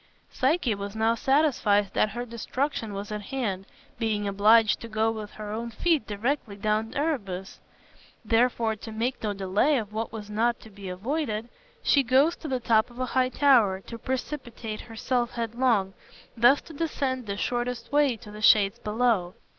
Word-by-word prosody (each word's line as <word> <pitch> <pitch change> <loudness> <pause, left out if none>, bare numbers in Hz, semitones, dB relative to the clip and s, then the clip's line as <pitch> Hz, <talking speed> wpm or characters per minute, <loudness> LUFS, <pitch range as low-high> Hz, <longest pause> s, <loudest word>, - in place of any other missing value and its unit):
Psyche 270 -3 +1
was 200 +1 -6
now 220 +1 +2
satisfied 230 -7 +2
that 215 - +2
her 240 +3 -5
destruction 235 -1 -3
was 200 +2 -6
at 210 0 -3
hand, 200 -5 -3 0.3
being 215 -3 0
obliged 210 +2 +4
to 230 - -8
go 220 0 +1
with 215 -2 -6
her 210 -1 -7
own 230 +2 -4
feet 300 +3 +1
directly 220 +1 -2
down 215 +2 0
to - - -7
Erebus. 200 - -3 0.7
Wherefore, 230 -1 +2
to 225 - -9
make 235 +4 -2
no 210 -2 -1
delay 200 +9 +2
of 215 -3 -4
what 225 +1 -3
was 215 -2 -7
not 230 +3 0
to 220 - -14
be 195 -1 -8
avoided, 225 - -3 0.3
she 280 - +4
goes 270 +6 +3
to 315 - -8
the 260 -3 -1
top 225 -1 +2
of 240 - -16
a 255 - -1
high 255 -1 +3
tower 240 -9 +4
to 230 +3 -9
precipitate 245 -4 -4
herself 240 +1 -2
headlong, 230 -4 0 0.4
thus 245 +4 +5
to 325 - -13
descend 270 -6 -2
the 200 0 -3
shortest 240 +1 -2
way 285 -4 +3
to 210 -1 -12
the 210 0 -9
shades 205 -2 +5
below. 210 -5 0
225 Hz, 175 wpm, -27 LUFS, 210-255 Hz, 0.7 s, thus